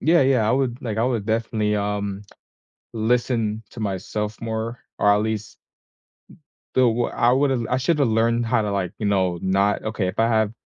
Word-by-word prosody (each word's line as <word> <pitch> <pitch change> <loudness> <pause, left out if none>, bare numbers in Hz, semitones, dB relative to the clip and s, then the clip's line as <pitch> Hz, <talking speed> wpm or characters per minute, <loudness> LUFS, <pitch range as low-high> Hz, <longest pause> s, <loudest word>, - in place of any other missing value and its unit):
Yeah, 170 +2 +4
yeah, 130 -5 +3
I - - +3
would, 130 -2 0
like, 110 -3 -3
I 115 - +2
would 120 -5 -1
definitely, 110 -1 0
um, 100 -1 -2 0.7
listen 115 -1 0
to 115 - -10
myself 105 +1 -3
more, 115 +1 -4 0.2
or 105 - +4
at 105 - +3
least 110 -1 -4 1.2
the - - +3
w 120 -1 +2
I 120 - +2
would've 130 -3 +1
I 125 - +2
shoulda 145 +2 +2
learned 115 0 +1
how 115 -1 +2
to, 105 - -2
like, 95 -3 -2
you 105 - -2
know, 95 -3 +1
not 100 +2 +1
okay, 110 -3 -2
if 90 - -6
I 115 +1 +3
have 110 -2 +2
110 Hz, 185 wpm, -23 LUFS, 105-120 Hz, 1.2 s, Yeah